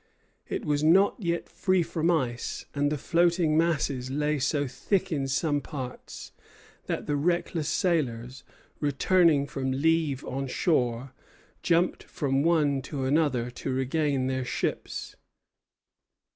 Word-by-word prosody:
It - - -4
was 145 0 0
not 190 +6 +5
yet 170 -4 -2
free 185 -2 +1
from 165 +1 -1
ice; 125 -8 -1
and 145 0 +1
the 150 - 0
floating 170 0 +2
masses 140 -6 +1
lay 150 +2 0
so 145 +1 +1
thick 190 +8 -1
in 140 -4 -1
some 145 +2 0
parts 130 -4 -8 0.6
that - - -2
the 145 - 0
reckless 165 0 0
sailors, 130 - -1 0.4
returning 150 +1 +3
from 135 -1 -3
leave 150 0 +1
on 135 +1 -3
shore, 125 -3 0 0.5
jumped 175 +1 +2
from 135 -2 -1
one 150 -4 +2
to 140 0 -5
another 130 -4 +1
to 130 +2 -5
regain 135 +1 0
their 130 0 -1
ships. 125 - -3
145 Hz, 130 wpm, -27 LUFS, 130-165 Hz, 0.6 s, not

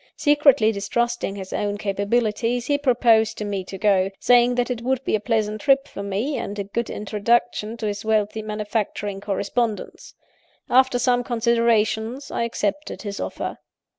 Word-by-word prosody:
Secretly 285 -6 +4
distrusting 225 +1 -1
his 190 -1 -7
own 205 0 -1
capabilities, 220 +4 0
he 285 - +1
proposed 235 -5 +3
to 210 - -4
me 200 -2 -3
to 195 - -7
go; 195 -1 +2
saying 245 0 +4
that 245 0 0
it 235 -2 -3
would 260 +2 -1
be - - -1
a 215 - +3
pleasant 215 -1 -1
trip 275 0 +3
for 200 - -8
me, 205 +9 -2
and 205 - -5
a 200 - -2
good 220 +4 -3
introduction 215 +1 0
to 225 - -4
his 205 0 -3
wealthy 220 0 0
manufacturing 210 -1 -3
correspondents. 205 +2 -3 0.6
After 260 0 +4
some 245 0 +2
consideration, 230 0 +1
I 235 - -1
accepted 230 +5 -3
his 200 -2 -5
offer. - - -4
220 Hz, 160 wpm, -23 LUFS, 205-245 Hz, 0.6 s, Secretly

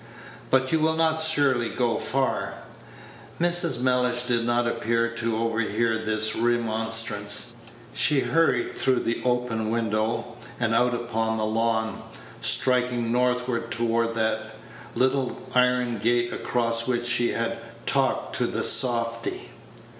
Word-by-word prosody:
"But 130 0 +2
you 160 - +2
will 160 +1 +1
not 160 0 +1
surely 140 -7 +3
go 120 -2 -1
far?" 135 0 -1 0.8
Mrs. 175 -6 +2
Mellish 125 -1 +1
did 120 -1 0
not 120 0 +1
appear 115 0 0
to 115 -1 -3
overhear 115 0 -1
this 110 -1 0
remonstrance. 115 -1 +1 0.4
She 145 -3 +3
hurried 165 -7 +1
through 130 -2 +1
the 115 - -2
open 125 -3 -1
window, 115 +1 -2 0.2
and 115 -2 0
out 120 +1 +2
upon 115 -1 -2
the 110 - -1
lawn, 110 0 -1 0.4
striking 125 -2 +3
northward 125 -1 0
toward 115 0 -1
that 110 -1 0 0.5
little 130 0 0 0.2
iron 125 -2 +1
gate 120 +2 0
across 115 -1 -1
which 120 -1 -1
she 120 0 +2
had 115 0 -3 0.3
talked 135 -1 0
to - - 0
the - - -3
softy. 115 - +1
120 Hz, 125 wpm, -24 LUFS, 115-125 Hz, 0.8 s, surely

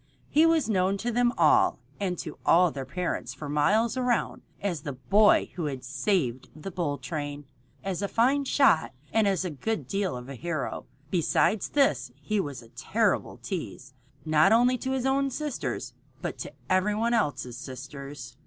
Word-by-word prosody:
He 315 +3 +5
was 330 -2 +3
known 195 -2 +2
to 240 +4 -2
them 240 +1 +3
all - - +4 0.2
and 185 -3 -1
to - - -7
all 175 0 +5
their 135 -2 -6
parents 140 -4 -3
for 145 +2 -7
miles 210 - +2
around 250 -2 0 0.2
as 180 -7 -2
the 145 -1 -5
boy 200 - +4
who 170 - -3
had 135 -3 -4
saved 130 - -1
the 155 +5 -7
bull 165 -5 -2
train, 145 +1 -5 0.4
as 190 -1 -3
a 200 - 0
fine 265 +7 +2
shot, 265 - +3 0.2
and 220 -2 +3
as 190 -2 +1
a 180 - -2
good 220 +10 -3
deal 195 -8 -1
of 125 +1 -9
a 140 - -7
hero. 155 +2 -4 0.2
Besides 180 +4 +2
this 135 - +2
he 150 +10 -2
was 140 -9 -4
a 115 - -17
terrible 200 - 0
tease, 135 - -6 0.3
not 155 +4 +4
only 245 +3 +5
to 260 - -3
his 260 -1 -1
own 275 +1 +2
sisters, 295 0 -4 0.3
but - - -5
to - - -6
every 185 +3 +2
one 230 +2 +1
else's 140 - 0
sisters. 135 -1 -8
180 Hz, 175 wpm, -27 LUFS, 140-220 Hz, 0.4 s, He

